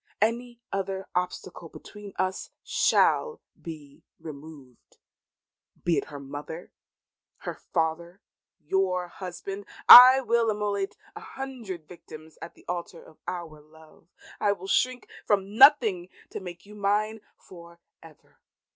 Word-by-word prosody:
Any 235 +2 -1
other 195 0 -3
obstacle 180 -1 -4
between 205 +3 -12
us 185 0 -2
shall 465 -2 +2 0.2
be 150 -4 -11 0.2
removed; 145 -4 -13 0.9
be 170 -2 +1
it - - -7
her 145 -2 -9
mother, 145 +5 -8 0.7
her - - -5
father 170 +3 -3 0.4
your 180 +1 -1
husband! 195 +2 -8 0.2
I 255 +2 +12
will 235 -2 +1
immolate 205 -2 -2 0.2
a - - -7
hundred 260 - -8
victims 160 -2 -13
at 165 - -9
the - - -21
altar 175 -1 -5
of 155 - -19
our 165 -4 -6
love. 160 +1 -20 0.3
I 205 -1 +2
will 190 -1 -11
shrink 250 +4 0 0.2
from 200 0 0
nothing 225 -10 +5 0.2
to - - -5
make 175 -2 -10
you 210 - -14
mine 210 +2 -1 0.2
for 170 -2 -15 0.2
ever. 160 -2 -19
185 Hz, 125 wpm, -26 LUFS, 165-210 Hz, 0.9 s, I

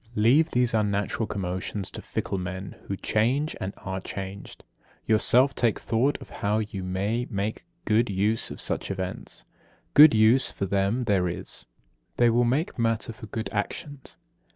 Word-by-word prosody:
Leave 130 +10 +4
these 125 -1 +2
unnatural 105 0 0
commotions 95 0 -3
to - - -7
fickle 95 - -3
men 95 +1 -5
who 100 - -2
change 130 +11 +1
and 95 - -2
are 95 0 -5
changed. 95 +1 -7 0.4
Yourself 125 +5 +4
take 115 -3 +1
thought 125 +6 +1
how 105 +1 -1
you 105 -2 -3
may 100 +6 -1
make 105 0 -3 0.2
good 110 +2 +2
use 105 +3 0
of - - -8
such - - -2
events. 95 -1 -4 0.5
Good 150 -4 +9
use 110 +5 +5
for 100 - -3
them 100 +6 0
there 100 -5 +2
is; 65 -7 -4 0.5
they 120 -1 +5
will 120 +1 +3
make 135 +4 0
matter 115 0 0
for 110 0 -11
good 110 +1 -4
actions. 135 +6 -5
110 Hz, 155 wpm, -26 LUFS, 100-120 Hz, 0.5 s, Good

